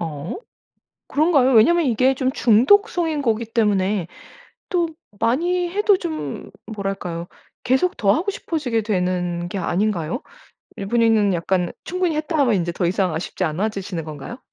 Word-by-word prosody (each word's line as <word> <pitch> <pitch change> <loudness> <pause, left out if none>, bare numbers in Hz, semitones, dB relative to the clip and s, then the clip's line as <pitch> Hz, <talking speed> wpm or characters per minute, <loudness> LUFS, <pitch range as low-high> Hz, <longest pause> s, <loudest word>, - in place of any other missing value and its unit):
어 155 - -5 0.7
그런가요? 285 -4 +3
왜냐하면 320 +9 +5
이게 255 +3 +3
좀 260 0 -1
중독성인 315 - +3
거기 230 -2 0
때문에 205 -5 0 0.6
또 345 -3 +1 0.3
많이 345 +9 +1
해도 410 +1 +3
좀 325 -4 -5 0.2
뭐랄까요? 195 -5 -4 0.4
계속 265 +9 +1
더 200 -2 +3
하고 365 - -1
싶어지게 275 - -2
되는 180 -3 -1
게 195 - -4
아닌가요? 185 - -1 0.6
이분이는 215 -1 +2
약간 175 +1 0
'충분히 360 -3 -1
했다.' 310 +1 -2
하면 255 -6 +3
인제 170 -1 -1
더 175 0 -1
이상 185 -1 0
아쉽지 175 +3 -3
않아지시는 185 0 -3
건가요? 155 - -8
220 Hz, 315 characters per minute, -21 LUFS, 185-305 Hz, 0.7 s, 왜냐하면